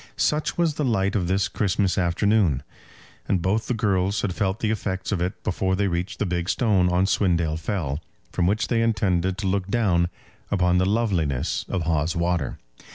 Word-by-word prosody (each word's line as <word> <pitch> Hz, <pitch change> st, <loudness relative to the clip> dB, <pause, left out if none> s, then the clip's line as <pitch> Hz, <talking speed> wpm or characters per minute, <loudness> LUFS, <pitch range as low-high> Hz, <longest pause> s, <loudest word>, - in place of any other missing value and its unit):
Such 150 Hz, 0 st, 0 dB
was 170 Hz, -3 st, +2 dB
the 150 Hz, -, -2 dB
light 105 Hz, -5 st, +1 dB
of 90 Hz, -4 st, 0 dB
this 95 Hz, 0 st, +1 dB
Christmas 95 Hz, 0 st, 0 dB
afternoon, 90 Hz, -5 st, +2 dB, 0.6 s
and 95 Hz, -, +2 dB
both 95 Hz, +6 st, 0 dB
the 125 Hz, -, 0 dB
girls 100 Hz, -2 st, +1 dB
had 95 Hz, -, -1 dB
felt 95 Hz, +1 st, -1 dB
the 110 Hz, -, 0 dB
effects 95 Hz, -3 st, -3 dB
of 95 Hz, -4 st, 0 dB
it 90 Hz, +2 st, -3 dB
before 95 Hz, 0 st, 0 dB
they 100 Hz, +1 st, +1 dB
reached 90 Hz, +4 st, -2 dB
the -, -, -1 dB
big 90 Hz, 0 st, -2 dB
stone 100 Hz, -7 st, +2 dB
on 90 Hz, +1 st, +2 dB
Swindale 85 Hz, -5 st, +1 dB
Fell, 80 Hz, -6 st, -2 dB, 0.3 s
from 90 Hz, -1 st, +1 dB
which 105 Hz, +3 st, +1 dB
they 115 Hz, -2 st, +1 dB
intended 95 Hz, -5 st, +1 dB
to 105 Hz, -, -4 dB
look 95 Hz, 0 st, 0 dB
down 95 Hz, -6 st, +2 dB, 0.4 s
upon 90 Hz, -2 st, +2 dB
the 95 Hz, -, +2 dB
loveliness 90 Hz, -, 0 dB
of 95 Hz, -4 st, -1 dB
Hawes 80 Hz, 0 st, 0 dB
Water. 85 Hz, +1 st, -1 dB
95 Hz, 185 wpm, -24 LUFS, 90-105 Hz, 0.6 s, was